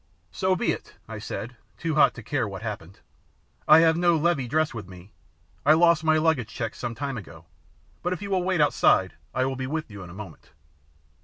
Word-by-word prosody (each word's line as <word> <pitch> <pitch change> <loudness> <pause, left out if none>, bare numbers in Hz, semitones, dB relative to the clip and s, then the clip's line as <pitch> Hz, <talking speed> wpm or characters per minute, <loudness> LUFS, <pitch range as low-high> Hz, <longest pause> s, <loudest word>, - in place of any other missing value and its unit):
"So 185 - +1
be - - +1
it," - - -7
I - - -7
said, 120 +1 -6 0.2
too 165 -2 -2
hot 150 - +4
to 120 - -9
care 125 -1 -1
what 100 +1 -7
happened. 100 -5 -7 0.7
"I 155 +1 +8
have 160 -1 +4
no 170 -1 +3
levee 155 -5 +1
dress 155 +5 0
with 105 -5 -7
me. 90 +2 -13 0.5
I 150 - +6
lost 170 0 +4
my 155 0 +3
luggage 155 -7 +1
check 115 -2 -4
some 120 -2 -5
time 135 0 -4
ago, 80 -4 -13 0.6
but 175 - -2
if 185 - -2
you 200 0 -6
will 190 -1 +2
wait 180 -2 +1
outside 95 -9 +3 0.2
I 130 - 0
will 135 0 -2
be 130 0 -4
with 155 -3 -4
you 100 -1 -9
in 90 - -9
a - - -11
moment." 95 -6 -11
135 Hz, 215 wpm, -25 LUFS, 105-160 Hz, 0.7 s, I